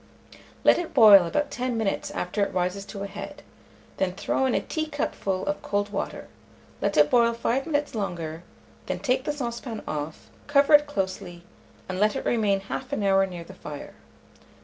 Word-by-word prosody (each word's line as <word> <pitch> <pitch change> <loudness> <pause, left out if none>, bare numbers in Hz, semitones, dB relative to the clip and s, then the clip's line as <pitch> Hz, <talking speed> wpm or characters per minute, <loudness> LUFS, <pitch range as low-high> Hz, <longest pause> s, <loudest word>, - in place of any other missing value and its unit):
Let - - +6
it 340 -3 -6
boil 205 -7 +9
about 290 - -1
10 250 -2 -2
minutes 215 -3 -1
after 180 +4 -3
it - - -1
rises 185 +2 -1
to 200 -1 -7
a - - -3
head, 210 +9 -8 0.5
then 185 -1 0
throw 265 +7 0
in 255 - +1
a - - +3
teacupful 290 - -3
of 200 0 -2
cold 205 0 -2
water; 200 - -4 0.5
let 200 -3 0
it 150 0 +5
boil 235 -1 +4
5 245 +5 -1
minutes 290 -2 -1
longer, 170 -7 -4 0.5
then - - -2
take 260 0 0
the - - 0
saucepan 235 -5 -5
off, 150 +1 -5 0.2
cover 285 +1 +4
it 295 0 +7
closely, 185 -8 -4 0.4
and 185 0 -4
let 210 +1 +3
it - - -4
remain 205 -4 +2
1/2 255 +4 -4
hour 195 0 +4
near 175 -2 -7
the 190 - -12
fire. 150 -5 -9
205 Hz, 175 wpm, -26 LUFS, 190-260 Hz, 0.5 s, boil